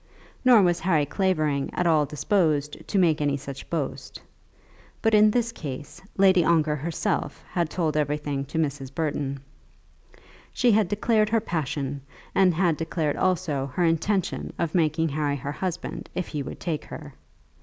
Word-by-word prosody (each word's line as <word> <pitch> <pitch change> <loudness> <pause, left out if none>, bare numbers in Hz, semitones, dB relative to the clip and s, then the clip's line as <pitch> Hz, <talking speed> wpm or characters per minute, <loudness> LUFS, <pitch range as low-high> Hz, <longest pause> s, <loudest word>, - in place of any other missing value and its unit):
Nor 245 -5 +7
was 175 -1 +2
Harry 160 -4 +2
Clavering 155 -5 0
at 180 - 0
all 155 -3 +3
disposed 150 -2 0
to - - -1
make 165 -5 +3
any 145 -1 +1
such 140 0 -9
boast. 155 -5 -4 0.8
But 225 -1 +1
in 215 0 +7
this 235 +1 0
case, 145 - -7 0.2
Lady 190 -2 +5
Ongar 155 -2 +3
herself 170 +7 -2
had 170 -3 0
told 160 -4 -1
everything 145 -2 -1
to 150 - -6
Mrs. 140 -4 -2
Burton. 140 -3 -2 1.1
She 245 -1 +3
had 210 -2 +3
declared 215 +2 +2
her 225 +1 +3
passion, 145 -7 -3 0.3
and 190 -2 +5
had 170 -3 +2
declared 160 -2 -1
also 155 -7 0
her 180 - +1
intention 175 +4 0
of 165 -2 -1
making 160 -1 +2
Harry 145 0 -1
her 140 +1 -4
husband 180 +3 -4
if 185 - -3
he 150 - -3
would - - -7
take 160 -4 -3
her. - - -9
160 Hz, 155 wpm, -25 LUFS, 145-185 Hz, 1.1 s, Nor